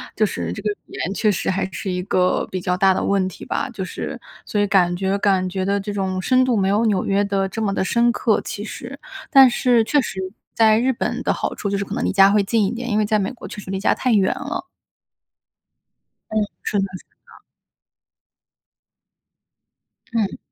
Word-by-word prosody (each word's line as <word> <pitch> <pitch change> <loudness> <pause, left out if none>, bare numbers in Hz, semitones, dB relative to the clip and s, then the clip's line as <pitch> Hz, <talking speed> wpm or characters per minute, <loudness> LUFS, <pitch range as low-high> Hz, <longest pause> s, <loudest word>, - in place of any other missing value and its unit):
就 215 - +1
是 85 - -2
这 - - -7
个 210 - -1 0.2
语 - - -22
言 185 - -3
确 215 0 +2
实 190 - -2
还 190 0 0
是 195 - -5
一 180 0 -2
个 185 -1 +1
比 185 -1 -3
较 180 +1 0
大 190 -1 +4
的 - - -1
问 195 -2 +1
题 185 - -9
吧， - - -2
就 190 - -4
是 - - -6 0.3
所 205 - 0
以 205 - +2
感 180 -3 +3
觉 195 +2 0
感 195 -2 +2
觉 185 0 -2
的 200 +1 +1
这 205 +1 -5
种 190 -2 -2
深 255 +4 +3
度， 250 - +1
没 195 -2 +2
有 215 +3 +2
纽 200 -4 +1
约 200 +1 +1
的 195 -1 0
这 225 - -6
么 200 -3 0
地 - - 0
深 235 +4 +2
刻， 225 -3 +1
其 205 - -5
实。 245 +5 -8 0.3
但 270 -3 +8
是 240 -2 +3
确 290 +6 +2
实 190 -7 -3 0.3
在 220 -1 +5
日 260 +2 +2
本 - - -3
的 - - +1
好 - - -3
处 200 - -3
就 200 - 0
是 200 - -1
可 - - -6
能 - - -1
离 - - +1
家 195 0 +6
会 205 0 +3
近 215 +2 +1
一 - - 0
点， 240 +1 -5
因 215 - +2
为 215 - +2
在 215 +1 +2
美 200 +3 -1
国 255 - -10
确 210 - -8
实 190 -1 -8
离 190 - -2
家 200 - +2
太 255 -2 +1
远 195 -3 +3
了。 300 +5 -4 1.7
嗯， 215 - -1 0.3
是 205 - 0
的 195 - +1
是 - - -17 0.2
的。 - - -18 2.7
嗯。 220 -4 0
200 Hz, 240 characters per minute, -21 LUFS, 190-225 Hz, 2.7 s, 但